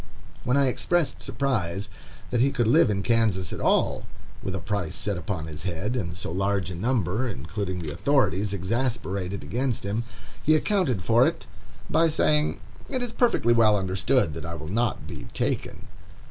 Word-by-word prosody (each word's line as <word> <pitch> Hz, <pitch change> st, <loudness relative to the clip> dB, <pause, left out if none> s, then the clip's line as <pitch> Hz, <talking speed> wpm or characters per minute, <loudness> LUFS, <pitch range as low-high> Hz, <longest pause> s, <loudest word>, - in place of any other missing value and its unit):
When 125 Hz, +3 st, +3 dB
I 140 Hz, -, +4 dB
expressed 165 Hz, +5 st, +1 dB
surprise 105 Hz, -8 st, -1 dB, 0.4 s
that 120 Hz, -1 st, +2 dB
he 135 Hz, -, +4 dB
could 120 Hz, -3 st, 0 dB
live 145 Hz, +1 st, +5 dB
in 100 Hz, -1 st, 0 dB
Kansas 110 Hz, -5 st, +1 dB
at -, -, -5 dB
all, -, -, +2 dB, 0.3 s
with -, -, -3 dB
a -, -, -2 dB
price 100 Hz, -6 st, -2 dB
set 100 Hz, -1 st, -1 dB
upon 85 Hz, -1 st, -3 dB
his 75 Hz, -1 st, -7 dB
head, 95 Hz, +7 st, -2 dB
and 85 Hz, -8 st, -3 dB
so 90 Hz, -, -4 dB
large 95 Hz, 0 st, 0 dB
a -, -, -5 dB
number, 115 Hz, +2 st, 0 dB
including 90 Hz, -, -4 dB
the 75 Hz, -, -4 dB
authorities, 105 Hz, -, +1 dB
exasperated 100 Hz, -2 st, -2 dB
against 125 Hz, +1 st, -1 dB
him, 105 Hz, +4 st, -1 dB, 0.4 s
he 155 Hz, -, +4 dB
accounted 155 Hz, -, +1 dB
for 115 Hz, +6 st, +5 dB
it -, -, -3 dB, 0.4 s
by 165 Hz, 0 st, +3 dB
saying, 150 Hz, -1 st, +2 dB, 0.3 s
"It 255 Hz, -2 st, -1 dB
is 245 Hz, -, -3 dB
perfectly 230 Hz, -, +3 dB
well 110 Hz, -3 st, +5 dB
understood 95 Hz, -, +1 dB
that 80 Hz, -, -6 dB
I 85 Hz, 0 st, -5 dB
will 80 Hz, -1 st, -7 dB
not 115 Hz, +2 st, 0 dB
be -, -, -8 dB
taken." -, -, -2 dB
105 Hz, 175 wpm, -26 LUFS, 95-130 Hz, 0.4 s, live